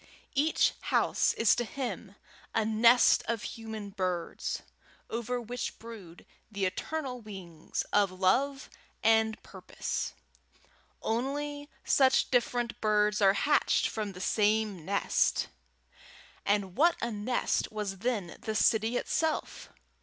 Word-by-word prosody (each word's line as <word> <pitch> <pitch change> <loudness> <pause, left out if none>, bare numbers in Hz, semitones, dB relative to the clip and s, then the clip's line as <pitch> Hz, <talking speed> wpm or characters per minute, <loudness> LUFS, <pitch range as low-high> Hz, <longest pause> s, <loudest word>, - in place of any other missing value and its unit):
Each 300 +3 +3
house - - +2
is 230 - +4
to 240 - -1
him 225 -6 -5 0.4
a 220 - +2
nest 230 +3 +5
of 230 -2 -1
human 220 -3 -6
birds, 185 -3 -3 0.5
over 235 +2 -2
which 240 +1 -5
brood 210 -7 -11 0.3
the 200 -2 -1
eternal 255 +6 -3
wings 185 -7 -6
of 205 -1 +4
love 245 +10 +1 0.4
and 220 0 +3
purpose. - - -5 0.9
Only 290 +5 -2
such 265 -1 +3
different 240 -2 0
birds 210 -1 +2
are 195 -1 +6
hatched 290 +7 +2
from 210 -3 -4
the 180 - -9
same 210 -3 +1
nest! 200 +2 +1 1.0
And 200 -2 +1
what 335 +7 +4
a 235 - -2
nest 220 +4 -1
was 205 -3 -4
then 210 -6 -2
the 220 - -3
city 225 +2 +3
itself! 320 +4 -2
220 Hz, 115 wpm, -30 LUFS, 200-245 Hz, 1.0 s, are